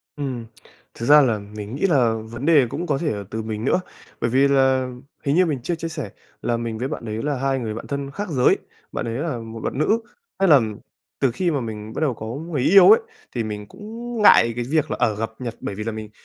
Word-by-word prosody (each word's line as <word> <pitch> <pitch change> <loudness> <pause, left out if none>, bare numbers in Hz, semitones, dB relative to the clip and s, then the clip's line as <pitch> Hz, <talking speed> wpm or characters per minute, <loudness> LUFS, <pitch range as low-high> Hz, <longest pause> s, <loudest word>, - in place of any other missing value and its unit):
Ừm, 130 -5 -4 0.5
thực 115 - -5
ra 150 +2 +8
là 115 -6 +2
mình 105 +2 -8
nghĩ 145 - 0
là 125 -9 +3
vấn 120 +4 -7
đề 150 -5 +6
cũng 175 +8 -4
có 145 - +1
thể 150 +1 -1
là 100 -1 -4
từ 110 - -3
mình 110 0 -4
nữa, 180 - +2 0.4
bởi 120 - +1
vì 135 +3 +4
là 130 -2 +3 0.4
hình 140 +1 +2
như 185 +1 +5
mình 150 -6 -1
chưa 175 - -1
chia 165 0 -4
sẻ 155 -3 -5 0.3
là 120 -1 0
mình 115 -1 -4
với 125 +4 -2
bạn 135 -5 -5
đấy 110 +1 -4
là 145 -2 -1
hai 135 0 0
người 110 -3 -3
bạn 115 - -7
thân 140 -1 -4
khác 205 +5 -5
giới, 130 -5 +3 0.3
bạn - - -3
ấy 115 +1 -3
là 150 -5 -2
một 115 0 -8
bạn - - -3
nữ. 210 +10 +2 0.4
Hay 195 -2 +4
là 140 -5 +8 0.6
từ 135 -3 +2
khi 175 +6 0
mà 140 -4 -1
mình 110 -1 -6
bắt - - -2
đầu 150 -5 +2
có 110 - -8
người 145 +4 -3
yêu 195 - +7
ấy, 445 +3 +8 0.4
thì 115 - 0
mình 105 -1 -5
cũng 230 +2 -7
ngại 115 - +7
cái 120 - -2
việc 155 0 +1
là, - - -1
ở, 110 - +2
gặp 110 +1 -3
Nhật 120 -2 -5
bởi 100 - -5
vì 105 - -4
là 115 - -2
mình 110 -1 -7
130 Hz, 255 wpm, -22 LUFS, 115-155 Hz, 0.6 s, ra